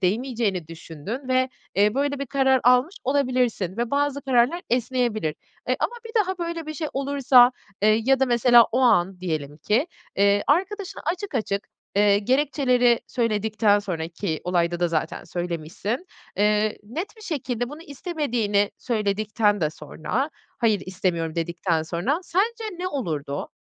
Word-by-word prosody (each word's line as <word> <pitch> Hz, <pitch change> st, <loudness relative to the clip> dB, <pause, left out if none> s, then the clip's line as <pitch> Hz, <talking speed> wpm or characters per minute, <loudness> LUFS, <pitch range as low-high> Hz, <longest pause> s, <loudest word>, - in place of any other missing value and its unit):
değmeyeceğini 205 Hz, -, -1 dB
düşündün 165 Hz, -, -7 dB
ve, 255 Hz, 0 st, +2 dB, 0.3 s
eee, 205 Hz, +3 st, +3 dB
böyle 285 Hz, +1 st, 0 dB
bir 280 Hz, -, -3 dB
karar 265 Hz, 0 st, +3 dB
almış 250 Hz, +8 st, +4 dB
olabilirsin 250 Hz, -8 st, 0 dB
ve 235 Hz, 0 st, -1 dB
bazı 285 Hz, -1 st, 0 dB
kararlar 265 Hz, +6 st, +2 dB
esneyebilir. 240 Hz, -, 0 dB, 0.3 s
Eee, -, -, +2 dB
ama -, -, 0 dB
bir 450 Hz, -, -10 dB
daha 375 Hz, 0 st, -4 dB
böyle 335 Hz, -2 st, -4 dB
bir 310 Hz, -, -5 dB
şey 310 Hz, +1 st, -3 dB
olursa, 270 Hz, -2 st, +5 dB, 0.3 s
eee, 215 Hz, +1 st, +4 dB
ya 270 Hz, 0 st, +3 dB
da 265 Hz, -, +4 dB
mesela 240 Hz, -1 st, +6 dB
o 250 Hz, -, +2 dB
an 190 Hz, -6 st, +3 dB
diyelim 155 Hz, -5 st, -3 dB
ki, 215 Hz, -, +1 dB, 0.3 s
eee, 200 Hz, +1 st, +4 dB
arkadaşına 385 Hz, +5 st, 0 dB
açık 360 Hz, +1 st, -3 dB
açık, 205 Hz, -4 st, -2 dB, 0.3 s
eee, 205 Hz, 0 st, +5 dB
gerekçeleri 250 Hz, -1 st, +2 dB
söyledikten 215 Hz, -3 st, +1 dB
sonra, 175 Hz, -6 st, -4 dB
ki 165 Hz, -1 st, -3 dB
olayda 175 Hz, -1 st, 0 dB
da 175 Hz, -, +2 dB
zaten 160 Hz, -1 st, -2 dB
söylemişsin, 175 Hz, -, -4 dB, 0.3 s
eee, 210 Hz, +1 st, +2 dB
net 335 Hz, -, -6 dB
bir 440 Hz, -, -14 dB
şekilde 245 Hz, -, -3 dB
bunu 300 Hz, +3 st, -9 dB
istemediğini 245 Hz, -, -1 dB
söyledikten 210 Hz, -2 st, 0 dB
de 155 Hz, -, +1 dB
sonra, 210 Hz, -, -3 dB, 0.3 s
"Hayır, 215 Hz, -5 st, +2 dB
istemiyorum." 175 Hz, -4 st, -1 dB
dedikten 170 Hz, 0 st, -1 dB
sonra 175 Hz, -, -1 dB
sence 445 Hz, +6 st, 0 dB
ne 365 Hz, +1 st, -2 dB
olurdu? 155 Hz, -, -3 dB
235 Hz, 145 wpm, -24 LUFS, 190-275 Hz, 0.3 s, mesela